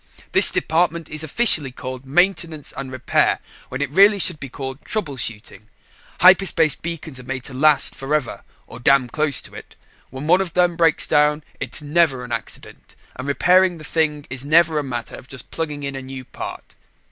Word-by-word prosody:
"This - - +6
department 170 0 0
is 155 0 -3
officially 160 - +2
called 130 +1 -8
Maintenance 165 -1 0
and 135 -1 -6
Repair, 130 -1 +1 0.3
when 125 +3 -3
it 145 - -3
really 200 +5 +6
should 180 -4 +1
be 135 - -7
called 135 +1 -7
trouble 180 -11 -4
shooting. 105 -3 -5 0.5
Hyperspace 180 -4 +5
beacons 160 -5 -7
are - - -11
made 130 0 -5
to 135 - -6
last 150 +3 +3
forever 140 -1 -3 0.2
or 115 - -11
damn 130 +1 +3
close 150 -3 0
to - - -12
it. - - -12 0.3
When 130 +3 -7
one 180 +4 +4
of 180 -3 -4
them 175 -1 +3
breaks 165 -2 +3
down, 150 +1 +2 0.2
it - - -5
is - - -3
never 145 -4 +1
an 120 - -9
accident, 115 -1 -7 0.2
and 130 +2 -7
repairing 180 +5 +3
the 155 - -12
thing 150 -2 -1
is 130 0 -3
never 155 +1 +3
a - - -3
matter 120 -4 -6
of - - -13
just 135 -2 -9
plugging 150 -3 -4
in 140 -1 -4
a 135 - -5
new 130 -1 -9
part." - - -9
150 Hz, 190 wpm, -21 LUFS, 130-165 Hz, 0.5 s, This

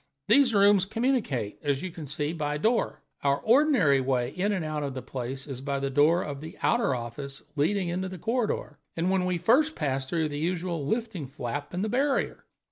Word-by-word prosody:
These 265 -5 +5
rooms 200 -1 +5
communicate, 215 - -1
as 140 -2 -1
you 185 -3 -5
see, 150 +2 -2
by 150 -3 -2
a - - -1
door. 225 +10 0 0.2
Our 140 0 +3
ordinary 225 - +4
way 130 -1 0
in 195 +6 0
and 185 -6 -1
out 155 -1 -2
of 140 -2 -3
the 130 - -5
place 130 +1 -5
is 135 -3 -6
by 140 0 -2
the 135 0 -2
door 155 +6 +4
of 140 -2 -6
the 160 +1 -9
outer 235 - +2
office 135 +4 -6
leading 180 +6 +1
into 185 +2 -2
the 185 - -7
corridor, 220 - -2 0.2
and 185 +2 +1
we 180 -1 0
first 295 - +3
pass 135 -3 -2
through 160 -2 0
the 145 0 -4
usual 170 -2 -2
lifting 220 - -2
flap 140 +1 -5
in 185 - -1
the - - 0
barrier. 270 +5 0
160 Hz, 200 wpm, -27 LUFS, 140-200 Hz, 0.2 s, These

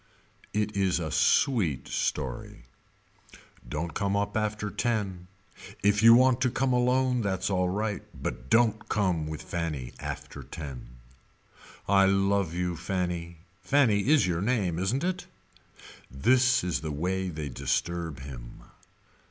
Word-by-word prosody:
It 105 0 -1
is 95 -2 +1
a 80 -3 -3
sweet 100 - +2
story. 65 -3 -3 1.1
Don't 80 +4 -3
come 100 +3 0
up 100 0 -1
after 105 -1 -1
ten. 100 -7 -2 0.6
If 105 +1 +3
you 115 +1 +9
want 130 0 +4
to 130 - +3
come 135 +2 0
come - - +2
alone 125 0 +2
that's 100 -2 -1
alright 100 +3 0
but 65 - -6
don't 115 -2 +2
come 90 -7 0
with 80 -1 -6
Fanny 75 -8 -4
after - - -6
ten. 70 -6 -8 1.0
I 95 -1 +5
love 95 -2 +2
you 90 -1 -1
Fanny 85 -1 -3 0.2
Fanny 115 0 +3
is 150 0 +5
your 85 -1 -1
name 100 -7 0
isn't 115 - 0
it. 180 0 -2 0.8
This 125 - +3
is 90 -7 -1
they 80 - -4
way 90 +5 -2
they 75 -4 -5
disturb 80 +3 -2
him. 65 -3 -10
95 Hz, 135 wpm, -28 LUFS, 85-110 Hz, 1.1 s, you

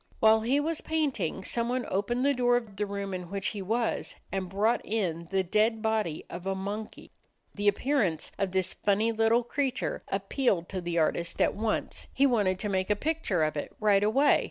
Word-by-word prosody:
While 220 0 +5
he 255 +6 +2
was 315 +2 -1
painting, 295 - -1
someone 240 +4 0
opened 240 +7 0
the 285 - +4
door 245 -1 +3
of 225 -5 -6
the 210 +1 -2
room 200 -1 -4
in 180 -2 -5
which 195 0 -1
he 205 - -5
was 225 +4 -1 0.2
and 190 -2 -2
brought 210 +5 +1
in 170 -6 -2
the 195 -1 +1
dead 215 +4 +1
body 215 -8 -1
of 175 +2 -7
a 195 - 0
monkey. 205 +3 -6 0.4
The 205 0 -2
appearance 205 - +1
of 195 -2 0
this 185 -1 0
funny 210 +3 +1
little 225 +2 +3
creature 270 +1 -2
appealed 195 -2 0
to 190 -2 -3
the 170 0 -3
artist 170 +1 0
at - - +3
once. 215 +1 -2
He 275 - +4
wanted 205 -8 +2
to 210 - -3
make 190 -1 -1
a 210 - +3
picture 290 - 0
of 155 -1 0
it 145 - -5
right 205 -2 +4
away. 265 +8 +4
210 Hz, 195 wpm, -29 LUFS, 190-240 Hz, 0.4 s, While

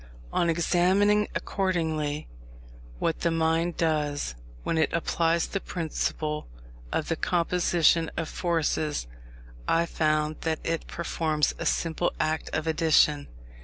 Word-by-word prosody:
On 170 - +2
examining, 185 +5 +3
accordingly, 160 -6 -1 0.7
what 165 - -1
the 170 - +1
mind 165 +1 +1
does 150 - 0 0.3
when 165 - 0
it 160 - +2
applies 170 0 +1
the 195 - -3
principle 155 -3 -3 0.4
of 155 - -1
the 165 - 0
Composition 170 -1 +2
of 165 -1 -1
Forces, 160 - -1 0.6
I 165 +1 +3
found 155 -1 0
that 160 -1 -1
it 165 -1 -2
performs 155 -3 0
a - - -1
simple 165 +1 0
act 155 0 0
of 155 - -1
addition. 155 -2 +3
165 Hz, 120 wpm, -27 LUFS, 155-170 Hz, 0.7 s, examining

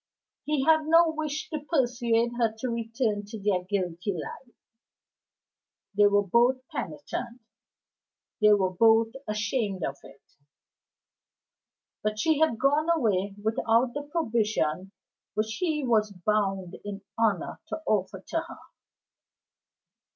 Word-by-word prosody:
He 295 -3 0
had 315 -1 +4
no 330 +1 +6
wish 310 -1 -3
to 310 - -2
persuade 240 -6 +1
her 230 -2 +3
to 250 +3 -3
return 225 -2 -1
to 220 +1 -7
their 195 -3 0
guilty 185 0 -2
life; 240 +8 -8 1.4
they 205 0 +6
were 205 0 +3
both 250 +6 +2
penitent, 180 - -5 1.0
they 210 0 +7
were 190 -2 +2
both 225 +3 +4 0.2
ashamed 210 -2 -1
of 140 - -4
it. 140 - -16 1.8
But 215 0 -1
she 310 +6 +2
had 315 -8 +3
gone 290 +6 +2
away 205 - +1
without 230 +2 +2
the 290 - -3
provision 215 - 0 0.4
which 215 +1 -1
he 310 -6 0
was 220 -3 +2
bound 195 -1 -1
in 205 -1 -7
honor 215 -6 0
to 320 - -5
offer 190 -2 -1
to 330 - 0
her. 335 +1 -9
225 Hz, 120 wpm, -27 LUFS, 200-265 Hz, 1.8 s, they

